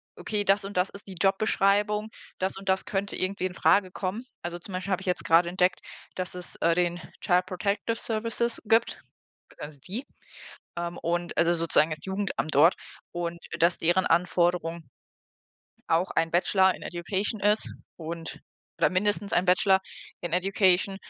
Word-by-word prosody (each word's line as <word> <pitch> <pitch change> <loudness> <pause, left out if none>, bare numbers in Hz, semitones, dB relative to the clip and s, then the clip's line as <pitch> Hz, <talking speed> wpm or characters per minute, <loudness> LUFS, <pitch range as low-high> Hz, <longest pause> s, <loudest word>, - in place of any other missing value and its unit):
„Okay, 210 -1 -2
das 195 0 +2
und 195 -1 -6
das 180 +2 +2
ist 200 0 -12
die 190 - -9
Jobbeschreibung, 205 +2 +2 0.3
das 190 +1 -1
und 195 0 -6
das 190 0 +1
könnte 200 0 -2
irgendwie 185 0 -2
infrage 185 +1 +2
kommen.“ 205 +7 -4 0.2
Also, 175 0 -5
zum 185 +2 -10
Beispiel 185 +2 -4
habe 190 - 0
ich 190 - -9
jetzt 180 -1 -1
grade 170 +1 +4
entdeckt, 180 +1 +1 0.4
dass 180 -1 -4
es, 180 - -6
äh, 170 0 +2
den 175 -1 0 0.2
Child-Protective-Services 215 +5 0
gibt, 225 +2 +2 0.6
also, 150 -1 -8
die, 230 +8 -4 0.7
ähm, 170 0 -4
und 175 +1 -2
also, 170 0 +3
sozusagen 165 -1 +3
das 155 0 -6
Jugendamt 190 -4 -2
dort 155 +6 +6 0.4
und 170 0 -3 0.2
dass 170 +1 +3
deren 175 +3 +2
Anforderung 170 -1 +1 1.0
auch 170 +3 +2
ein 165 0 +1
Bachelor 190 +2 +3
in - - -12
Education 195 +5 -3
ist 210 +2 +1 0.2
und 165 0 -7 0.4
oder - - +4
mindestens 205 +2 0
ein 180 - +3
Bachelor 190 +1 +4 0.4
in 175 - -4
Education 190 +1 +2
185 Hz, 155 wpm, -27 LUFS, 175-200 Hz, 1.0 s, dort